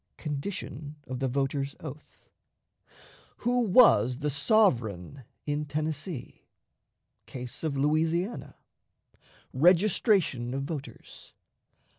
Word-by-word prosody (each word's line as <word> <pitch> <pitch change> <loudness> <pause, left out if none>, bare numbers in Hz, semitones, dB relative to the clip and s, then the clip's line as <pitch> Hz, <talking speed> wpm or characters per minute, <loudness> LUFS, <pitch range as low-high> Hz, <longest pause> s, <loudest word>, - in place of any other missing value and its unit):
Condition 150 -1 -5
of 130 -1 -5
the 135 - 0
Voter's 135 +1 -2
Oath. 150 -1 -11 1.2
Who 245 +1 +2
was 185 - +5
the 150 +1 -2
Sovereign 135 - +1 0.2
in 150 0 -2
Tennessee? 155 0 -4 0.9
Case 125 +2 -8
of 150 -3 -1
Louisiana. 160 - 0 1.0
Registration 170 - +3
of 135 - -2
Voters. 145 -1 -8
145 Hz, 85 wpm, -28 LUFS, 135-170 Hz, 1.2 s, was